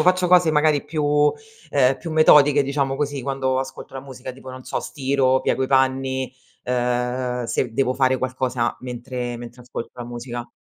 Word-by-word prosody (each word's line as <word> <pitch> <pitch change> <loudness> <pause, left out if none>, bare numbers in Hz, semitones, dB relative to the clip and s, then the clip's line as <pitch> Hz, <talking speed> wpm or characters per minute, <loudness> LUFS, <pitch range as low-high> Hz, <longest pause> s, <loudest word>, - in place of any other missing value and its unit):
faccio 180 0 +3
cose 180 -2 +5
magari 150 -1 +3
più 150 -1 +2 0.4
ehm, 135 -1 +3
più 165 - -6
metodiche 150 -2 +6
diciamo 135 -1 -1
così, 145 -2 -2
quando 130 -1 -1
ascolto 135 0 -6
la 135 - -5
musica 130 -1 -9
tipo 130 0 -11
non 130 0 -10
so, - - -3
stiro, 130 -2 +1
piego 130 - 0
i - - +1
panni, 130 -1 +1 0.3
ehm, 125 0 -1
se 115 +1 -1
devo 130 +2 +1
fare 130 -1 +2
qualcosa 130 -2 -1
mentre 125 -1 -5
mentre 120 +1 -10
ascolto 125 -1 -7
la 120 - -7
musica. 120 0 -6
130 Hz, 170 wpm, -22 LUFS, 125-140 Hz, 0.4 s, metodiche